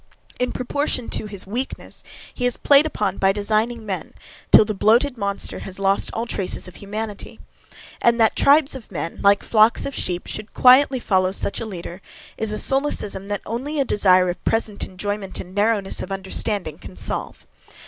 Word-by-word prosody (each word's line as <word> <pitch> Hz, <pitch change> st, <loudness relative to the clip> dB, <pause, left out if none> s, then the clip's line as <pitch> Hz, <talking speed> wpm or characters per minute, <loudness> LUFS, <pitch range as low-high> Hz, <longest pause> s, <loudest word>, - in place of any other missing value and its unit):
In 250 Hz, 0 st, 0 dB
proportion 255 Hz, -1 st, -2 dB
to 215 Hz, -, -2 dB
his 200 Hz, -2 st, -2 dB
weakness, 240 Hz, +7 st, -5 dB, 0.3 s
he 245 Hz, -, -1 dB
is 245 Hz, -, -1 dB
played 285 Hz, +2 st, +5 dB
upon 205 Hz, -9 st, -2 dB
by 195 Hz, 0 st, +4 dB
designing 215 Hz, +3 st, -1 dB
men, 195 Hz, -3 st, -5 dB, 0.4 s
till -, -, +8 dB
the 215 Hz, -, -2 dB
bloated 235 Hz, +7 st, +3 dB
monster 200 Hz, -3 st, -2 dB
has 190 Hz, -1 st, -6 dB
lost 195 Hz, 0 st, +1 dB
all 230 Hz, -, -3 dB
traces 195 Hz, -5 st, -3 dB
of 185 Hz, -, -12 dB
humanity. 210 Hz, +1 st, -6 dB, 0.6 s
And 235 Hz, 0 st, +3 dB
that 225 Hz, -1 st, +3 dB
tribes 285 Hz, 0 st, +4 dB
of 260 Hz, -6 st, -9 dB
men, 165 Hz, -1 st, -5 dB
like 200 Hz, 0 st, +4 dB
flocks 220 Hz, +1 st, +3 dB
of 280 Hz, -, -4 dB
sheep, 180 Hz, -7 st, -3 dB
should 215 Hz, 0 st, -8 dB
quietly 260 Hz, +1 st, +6 dB
follow 185 Hz, -5 st, +1 dB
such 200 Hz, -, -2 dB
a 230 Hz, -, -5 dB
leader, 180 Hz, -1 st, -8 dB, 0.3 s
is 220 Hz, -1 st, -1 dB
a 215 Hz, -, -1 dB
solecism 240 Hz, -9 st, 0 dB
that 205 Hz, -1 st, -3 dB
only 285 Hz, +6 st, -3 dB
a 275 Hz, -, +2 dB
desire 185 Hz, -5 st, +4 dB
of 175 Hz, -, -4 dB
present 220 Hz, -2 st, -1 dB
enjoyment 200 Hz, +1 st, -4 dB
and 185 Hz, -, -9 dB
narrowness 205 Hz, -1 st, 0 dB
of 185 Hz, -, -7 dB
understanding 190 Hz, -3 st, -2 dB
can -, -, -11 dB
solve. -, -, -4 dB
210 Hz, 180 wpm, -22 LUFS, 195-240 Hz, 0.6 s, till